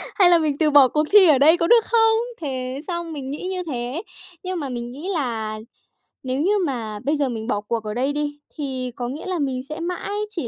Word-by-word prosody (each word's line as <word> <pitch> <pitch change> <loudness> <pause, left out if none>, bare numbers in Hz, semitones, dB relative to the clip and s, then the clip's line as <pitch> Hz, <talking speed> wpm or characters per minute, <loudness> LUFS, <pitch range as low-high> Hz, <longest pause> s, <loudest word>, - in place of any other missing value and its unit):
Hay 375 -4 +7
là 345 - +7
mình 300 -3 0
từ 310 -2 +3
bỏ 280 -2 +7
cuộc 300 +4 +1
thi 400 -3 +8
ở 295 -4 +6
đây 315 +5 +6
có 335 - +1
được 465 +1 +5
không? 450 -1 +4 0.2
Thế 260 -2 -4
xong 340 -2 -4
mình 270 -3 -6
nghĩ 300 +6 -5
như 370 -1 -3
thế. 255 0 -4 0.4
Nhưng 370 -1 -3
mà 280 -4 -4
mình 240 -1 -5
nghĩ 295 +9 -7
là 225 -8 -3 0.6
nếu 260 +1 -2
như 375 +6 +2 0.2
mà 225 -6 -4
bây 290 +4 0
giờ 280 -3 0
mình 225 -1 -5
bỏ 205 -3 -1
cuộc 225 +1 -3
ở 210 - -4
đây 260 +5 0
đi, 290 0 -3 0.2
thì 260 -4 -3
có 245 - -4
nghĩa 280 +5 -7
là 370 -2 -2
mình 265 -3 -1
sẽ 305 - -5
mãi 360 +3 -4 0.2
chỉ 335 - -4
285 Hz, 240 wpm, -22 LUFS, 255-340 Hz, 0.6 s, thi